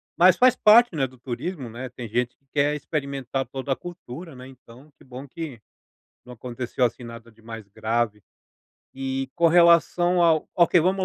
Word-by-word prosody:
mas 180 +1 +6
faz 255 -1 +5
parte, 220 -3 +5
né, 135 -3 0
do 130 0 -19
turismo, 130 +4 -6
né. 125 +3 -7
Tem 125 -1 -8
gente 120 +3 -2
que 140 - -43
quer 145 0 +1
experimentar 140 -3 -4
toda 135 +1 -6
a 135 - +2
cultura, 165 -3 -10
né, 125 0 -11
então 130 +2 -17
que - - -20
bom 130 +2 -10
que 145 -5 -8 0.7
não 125 - -11
aconteceu, 125 +1 -3
assim, 120 +1 -2
nada 115 0 -11
de 110 0 -24
mais 115 -2 -9
grave. 110 0 -2 0.7
E, 135 0 -3
com 170 -1 +3
relação 175 +1 +4
ao 160 -2 +2
ok, 175 0 +4
vamos 185 +3 0
135 Hz, 180 wpm, -24 LUFS, 120-170 Hz, 0.7 s, mas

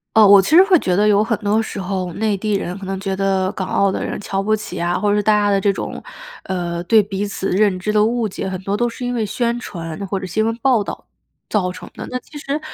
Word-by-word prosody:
呃 220 -2 +7
我 200 0 +8
其 310 +12 +1
实 365 - +9
会 385 -2 +5
觉 180 -8 0
得 210 +3 +3
有 205 0 +4
很 225 0 0
多 210 +1 +1
时 220 - -5
候， 185 -1 -3
内 215 +1 0
地 210 +2 -2
人 185 -2 -2
可 195 - -8
能 190 0 -3
觉 195 -1 -2
得， 190 -1 0
港 190 -2 -4
澳 200 -1 +2
的 - - -3
人 - - -4
瞧 195 -1 -2
不 215 +2 +1
起 210 -3 -7
呀， 175 +1 0
或 205 -1 +1
者 210 - +2
大 215 +1 +2
家 205 -1 +2
的 195 -1 +2
这 200 - +3
种， 195 - -5 0.4
呃， 175 -2 -3
对 220 +4 +5
彼 200 0 -3
此 195 -1 -3
认 195 0 +2
知 210 +4 -2
的 210 - +4
误 230 +1 +1
解 190 -1 -5
很 185 - -4
多 200 +1 -1
都 240 +3 +1
是 245 +1 -7
因 245 - -2
为 235 -2 0
宣 235 +3 -1
传 170 -2 -6
或 195 0 -2
者 190 - -6
新 215 +5 0
闻 225 +1 -1
报 250 -6 +3
道 - - -7 0.4
造 185 -4 0
成 185 - -10
的。 - - -8
那 255 - -3
其 295 +4 -13
实 285 +1 -3
200 Hz, 295 characters per minute, -19 LUFS, 190-220 Hz, 0.4 s, 实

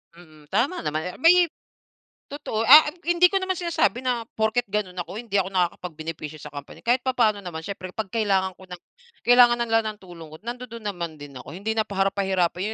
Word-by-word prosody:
Mm, 155 -3 -17
tama 285 - 0
naman 155 +1 -1
eh - - -10
may 345 +3 +5 0.8
totoo 280 -6 -4
ah, 300 +4 +11 0.2
hindi 345 +1 +5
ko 390 - +2
naman 375 -1 -2
sinasabi 330 -7 0
na 245 -2 0
porket 220 +2 0
ganun 195 -3 -3
ako, 175 +3 -7
hindi 225 -4 -3
ako 190 - -2
nakakapag-benepisyo 165 -4 -3
sa 150 - -10
company 145 0 -10
kahit 245 +2 +3
papaano 235 -5 +1
naman 160 -4 -7
siyempre 195 -1 -6
kapag 215 -4 -5
kailangan 195 -4 +1
ko 190 - -14
ng 180 -1 -9 0.4
kailangan 245 0 +6
na - - +2
nila 225 0 +4
ng 215 -1 -4
tulong 170 -4 -12
ko 155 - -11
nandudun 235 -2 -7
naman 170 -5 -4
din 145 -2 -11
ako 170 - -10
hindi 210 +3 -2
na 220 -1 -1
para 195 0 0
pahirapan 190 -3 0
205 Hz, 200 wpm, -24 LUFS, 175-245 Hz, 0.8 s, ah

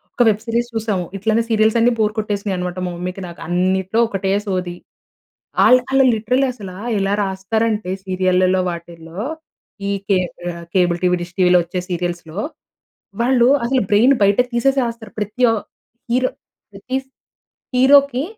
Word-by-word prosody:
ఒక 245 - +4
web 210 0 0
series 235 +1 -1
చూసాము. 210 -5 -1
ఇట్లనే 220 +3 +1
సీరియల్స్ 220 0 +3
అన్నీ 235 +2 +4
బోర్ 215 -1 +2
కొట్టేసినాయి 205 -2 -2
అనమాట 180 0 -4
మా 180 - -3
మమ్మీకి 180 +2 -5
నాకు. 170 - -11
అన్నిట్లో 185 +4 0
ఒకటే 195 -2 -2 0.2
సోది. 180 -2 -2 0.9
ఆళ్ళు 255 0 +6
ఆళ్ళు 270 0 +4
లిటరల్లీ 250 +5 +1
అసల 205 -6 -9 0.3
ఎలా 195 +1 0
రాస్తారంటే 210 +2 -1 0.2
సీరియల్లల్లో 185 0 +2
వాటిల్లో 170 +1 -8 0.7
ఈ - - 0 0.2
కేబ్ 185 -3 +1 0.4
కేబుల్ 175 -2 +3
టీవీ, 180 0 +3
డిష్ 175 0 -8
టీవీలో 180 -1 +5
వచ్చే 175 +2 -4
సీరియల్స్‌లో. 175 -1 -4 0.8
వాళ్ళు 245 0 +4 0.2
అసలు 260 +1 +1
బ్రెయిన్ 230 +7 +5
బయటకి 205 +5 +3
తీసేసి 270 +3 +2
రాస్తారు. 230 -3 -7
ప్రతి 210 +4 -3
ఆహ్, 225 -2 -1 0.5
హీరో 255 +1 +2 0.4
ప్రతి 200 +6 -6
స్ - - -34 0.7
హీరోకి 275 0 +5
200 Hz, 145 wpm, -19 LUFS, 180-235 Hz, 0.9 s, ఆళ్ళు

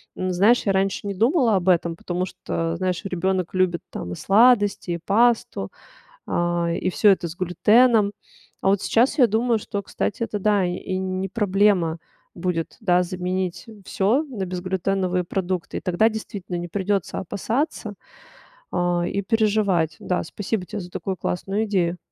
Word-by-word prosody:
М, 185 - -2
знаешь, 210 +8 +3
я - - +4
раньше 195 +1 0
не 200 - -3
думала 235 - +3
об 185 0 +1
этом, 170 -2 +2
потому 180 +2 -3
что, 165 -2 -3
знаешь, 185 -1 -1
ребенок 185 -1 -1
любит 185 -2 +1
там 90 - -6
и - - -5
сладости, 205 -3 +3
и 170 - -2
пасту, 230 +3 +1 0.6
а, 175 0 0
и 180 +2 -1
всё 210 - +3
это 185 -3 +2
с 165 - -9
глютеном. 210 +4 +4 0.5
А - - +2
вот 200 0 +2
сейчас 245 +5 +2
я 250 - +7
думаю, 230 +2 +1
что, 200 -1 -4
кстати, 205 +2 -3
это 215 -2 -2
да, 205 -1 +2
и 185 +1 -3
не 190 0 -2
проблема 195 -6 +2 0.4
будет, 170 -2 -3
да, 180 -3 +3
заменить 185 +2 -3 0.2
всё 230 +11 +1
на 235 -9 -5
безглютеновые 185 0 -1
продукты. 185 -1 -3
И - - -8
тогда 185 +4 +2
действительно 200 -4 -6
не 175 0 -4
придётся 195 0 -1
опасаться, 220 - -2 0.8
а, 175 -1 0
и 200 - -1
переживать. 205 -6 +1
Да, 180 - -1
спасибо 205 +2 -3
тебе 205 - -5
за 175 0 -9
такую 190 +1 -4
классную 195 +5 -2
идею. 180 -4 0
190 Hz, 160 wpm, -23 LUFS, 180-210 Hz, 0.8 s, я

